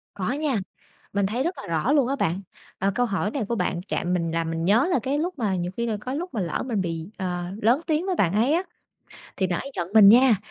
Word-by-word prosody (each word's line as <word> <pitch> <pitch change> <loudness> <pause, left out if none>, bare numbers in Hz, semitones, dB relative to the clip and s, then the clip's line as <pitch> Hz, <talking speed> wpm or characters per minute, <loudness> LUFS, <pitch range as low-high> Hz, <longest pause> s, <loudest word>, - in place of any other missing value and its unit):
Có 200 +4 -2
nha. 285 -4 0 0.6
Mình 200 0 +1
thấy 230 +7 -1
rất 345 +4 -1
là - - -8
rõ 165 - 0
luôn 280 -5 +3
á 275 - 0
bạn. 180 -7 -1 0.4
À, 195 +1 +1
câu 245 - +2
hỏi 205 -1 -1
này 255 -5 -2
của 235 - 0
bạn 180 -3 -1
chạm 180 - -1
mình, 170 -2 0
làm 165 0 -1
mình 165 0 -2
nhớ 220 - +4
là 270 - +3
cái 270 +2 0
lúc 345 +5 -1
mà 205 -5 0
nhiều 175 0 -2
khi 235 - 0
là 220 -2 -1
có 255 - -4
lúc 340 +4 -4
mà 220 - -1
lỡ 170 -4 -2
mình 225 -6 -1
bị, 165 -1 -4
ờ, 180 -2 -3 0.2
lớn 235 +6 +4
tiếng 315 +2 +1
với 380 -2 0
bạn 180 - +2
ấy 230 +8 +3
á, 345 +3 +2 0.7
thì 190 - +1
bạn 175 -2 -1
ấy 275 - -7
giận 170 - -2
mình 210 -3 +9
nha, 240 +1 +7
215 Hz, 270 wpm, -25 LUFS, 180-265 Hz, 0.7 s, mình